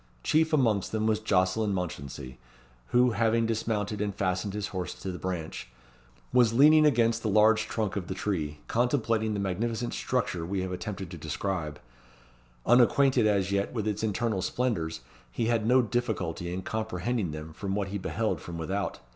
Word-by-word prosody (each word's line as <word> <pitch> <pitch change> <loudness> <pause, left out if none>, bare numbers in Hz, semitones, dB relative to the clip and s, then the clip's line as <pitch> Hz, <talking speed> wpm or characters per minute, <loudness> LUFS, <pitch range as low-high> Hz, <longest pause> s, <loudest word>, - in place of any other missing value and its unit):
Chief 160 +1 +3
amongst 115 - +2
them 110 0 0
was 110 -1 +2
Jocelyn 100 0 +1
Mounchensey, 70 -7 -5 0.5
who, 125 - +4
having 115 +1 +2
dismounted 110 -2 -1
and 100 -2 -2
fastened 95 +1 -1
his 105 -2 -3
horse 90 -3 -4
to 95 - -5
the 90 - -7
branch, 85 -8 -4 0.6
was 120 -3 +5
leaning 150 +4 +7
against 115 -4 +2
the 110 - -1
large 110 +2 +4
trunk 105 -5 -2
of 95 -4 -3
the 95 - -4
tree, 80 -7 -3
contemplating 115 -3 +1
the - - -2
magnificent 115 +5 -2
structure 115 -9 -1
we 95 +3 -2
have 95 - -4
attempted 95 0 -5
to 85 - -8
describe. 80 0 -3 0.9
Unacquainted 125 0 +5
as 100 -2 +1
yet 100 0 0
with 110 -3 -2
its 105 -1 -1
internal 110 -2 0
splendours, 85 -10 -1 0.3
he 115 - -1
had 115 -1 +1
no 125 +1 +5
difficulty 100 -7 -2
in 95 +1 -4
comprehending 110 -2 -2
them 75 +1 -7
from 95 +3 -3
what 100 -2 -1
he 100 +1 -3
beheld 110 +3 -1
from 85 -1 -7
without. 95 +4 -2
105 Hz, 170 wpm, -28 LUFS, 90-115 Hz, 0.9 s, leaning